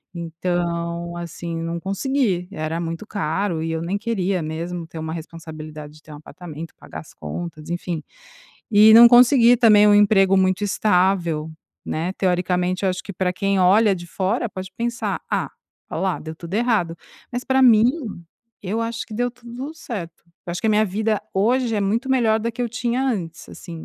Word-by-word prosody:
Então, 170 0 -3
assim, 170 0 -6
não 165 +1 -3
consegui. 195 0 -1
Era 155 -2 -3
muito 165 +4 -5
caro 190 -3 -2
e 165 - -2
eu 160 - -2
nem 175 +4 -2
queria 200 -4 -1
mesmo 165 +2 -5
ter 165 - -11
uma 160 0 -4
responsabilidade 155 -2 -9
de 155 - -17
ter 155 - -14
um - - -9
apartamento, 160 0 -10
pagar - - -10
as - - -16
contas, 155 - -7
enfim. 175 -1 -3 0.7
E 215 0 +7
não 235 +1 +11
consegui, 245 0 +6
também, 215 -3 +6
um 205 - +6
emprego 195 -2 +5
muito 185 +1 +2
estável, 180 -6 +1 0.3
né, 165 +4 -2
teoricamente, 180 0 0
eu 190 - +3
acho 185 +1 -4
que 200 - -8
pra 180 0 -1
quem 195 +1 0
olha 200 +3 +5
de 175 -1 -9
fora, 200 +8 -1
pode 185 -2 -7
pensar: 235 +1 -2
"Ah, - - 0 0.4
ó - - -4
lá, 190 -2 0
deu 160 0 -7
tudo 170 +3 -8
errado", 215 -7 +1 0.4
mas, 245 +1 -3
pra 265 0 +2
mim, 225 -4 +6 0.8
eu 205 +4 -2
acho 230 0 -3
que 220 - -9
deu 245 +2 0
tudo 245 +4 -8
certo. 195 - -7 0.2
Eu - - -4
acho 175 - -4
que - - -1
a - - +4
minha 215 0 +3
vida 215 +2 -1
hoje 235 +4 +1
é - - 0
muito 225 +7 -1
melhor 225 -4 +3
da 230 +2 -2
que 230 - -8
eu 240 - -1
tinha 240 +2 -1
antes, 180 -11 -3
assim, 165 -2 -9
190 Hz, 185 wpm, -22 LUFS, 170-220 Hz, 0.8 s, não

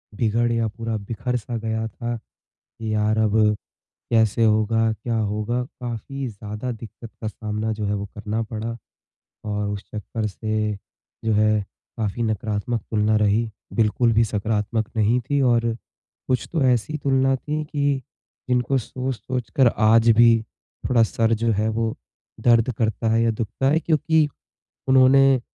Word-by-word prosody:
बिगड़ 115 +2 +1
गया, 115 -1 +1
पूरा 115 +1 -4
बिखर-सा 115 +2 -3
गया 110 0 -2
था 120 +1 -4 0.4
कि 110 -1 -6
यार 105 +1 +1
अब 110 0 +2 0.7
कैसे 115 0 +3
होगा, 110 +1 +3
क्या 115 +1 -3
होगा? 110 +3 -1 0.2
काफ़ी 125 +3 -4
ज़्यादा 105 +3 -6
दिक्कत 115 0 -10
का 110 - -1
सामना 110 +1 -3
जो 105 -1 -4
है 105 - 0
वो 100 0 -3
करना 105 +2 -2
पड़ा 110 +1 -5 0.7
और 105 -1 -2
उस 105 -1 -4
चक्कर 110 +1 -3
से 110 0 -2 0.5
जो 110 - +2
है 105 0 +3 0.4
काफ़ी 110 +2 -2
नकारात्मक 110 +1 -1
तुलना 110 0 +2
रही, 110 +2 +2 0.2
बिल्कुल 115 +1 +2
भी 115 +1 +4
सकारात्मक 105 +1 -1
नहीं 110 +3 +3
थी 145 -1 +2
और 115 -3 +2 0.5
कुछ 125 -3 0
तो 160 -4 +1
ऐसी 125 +5 +1
तुलना 135 -1 +2
थी, 150 +3 -3
कि 145 -2 0 0.5
जिनको 125 +2 +2
सोच-सोच 125 0 -4
कर 130 -4 +6 0.2
आज 115 +1 +5
भी 115 -1 +7 0.5
थोड़ा 120 -2 +4
सर 115 +1 +2
जो 115 - +3
है 105 +2 0
वो 110 0 -1 0.5
दर्द 115 +1 +4
करता 110 0 0
है 115 0 +3
या 115 - +3
दुखता 110 +4 -2
है, 160 +2 +3
क्योंकि 160 -1 +2 0.6
उन्होंने 130 0 +6
115 Hz, 150 wpm, -23 LUFS, 110-125 Hz, 0.7 s, भी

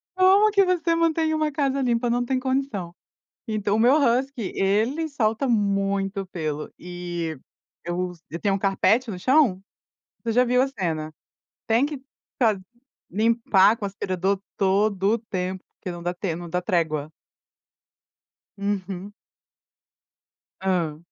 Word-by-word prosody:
Como 385 +3 +5
que 400 -1 +5
você 340 -2 +1
mantém 325 -1 +2
uma 310 -1 0
casa 275 -1 0
limpa, 240 -1 +1
não 245 +1 +1
tem 260 +1 0
condição. 260 -9 -2 0.6
Então, 210 -1 0
o - - 0
meu 245 +4 +6
Husky, 255 -5 +1
ele 225 +12 +1
solta 235 -2 0
muito 195 -2 0
pelo, 155 -4 -4
e 175 -2 -5 0.5
eu 180 +1 -2
s 170 -2 -18
eu 170 - -5
tenho 200 -2 +1
um - - 0
carpete 205 +5 +2
no 185 - -5
chão 255 -3 +3 0.6
você 230 - 0
já 250 +2 +4
viu 250 +1 +3
a 270 - +1
cena. 165 - -3 0.5
Tem 230 +4 +3
que 295 -1 -3 0.4
ta 225 -5 +3 0.5
limpar 220 0 +4
com 225 - -7
aspirador 195 0 -1 0.2
todo 200 +1 +2
o - - -1
tempo, 185 -4 -4
porque 185 - -6
não 175 -1 -7
dá 175 +1 -1
tem 175 -2 -3
não 175 0 -7
dá 180 +2 -1
trégua. 160 -5 0 1.5
Uhum. 200 -1 -3 1.5
Hã. 175 -5 0
205 Hz, 140 wpm, -24 LUFS, 185-255 Hz, 1.5 s, meu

